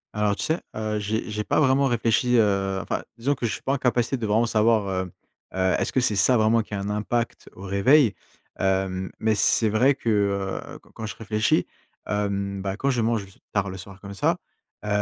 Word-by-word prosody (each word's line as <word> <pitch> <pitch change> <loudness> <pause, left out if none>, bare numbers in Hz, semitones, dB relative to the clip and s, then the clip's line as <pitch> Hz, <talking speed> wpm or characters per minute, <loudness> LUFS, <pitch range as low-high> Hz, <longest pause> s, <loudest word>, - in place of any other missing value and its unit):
Alors, 105 -1 +1
tu - - -4
sais, 160 +2 0
heu, 110 -1 -2
j'ai 110 +3 -2
j'ai 105 0 -2
pas - - +1
vraiment 135 -1 +3
réfléchi, 120 +1 +2
heu 100 -3 +2
enfin, - - -2 0.2
disons 135 +5 +1
que 125 -3 -2
je - - -2
suis - - -7
pas 135 - 0
en - - +1
capacité 125 +1 +1
de 115 -4 -3
vraiment 110 +3 +3
savoir, 110 -2 +2
hem, 90 -2 -7 0.4
heu, 95 0 +2
est-ce - - -1
que 130 - +1
c'est 110 -4 +1
ça 115 +5 +4
vraiment 110 +1 +3
qui 105 - -6
a - - -3
un 100 +1 -3
impact 115 +3 -2
au 95 - -11
réveil? 105 +6 +4 0.5
Hem, 95 -1 0
mais 110 0 +2
c'est 110 +1 +3
vrai 125 +6 +3
que, 115 - -3
heu, 100 -2 -1
quand - - -22
quand 110 - -6
je - - -6
réfléchis, 110 0 +1 0.4
hem, 100 -1 -2
bah, 95 +1 -3
quand 140 +2 +1
je 120 -3 0
mange 115 -2 0 0.3
tard 100 -2 0
le 95 - -7
soir, 95 +1 -11
comme 100 -1 -8
ça, 100 - +2 0.5
heu, - - -5
105 Hz, 220 wpm, -24 LUFS, 100-115 Hz, 0.5 s, ça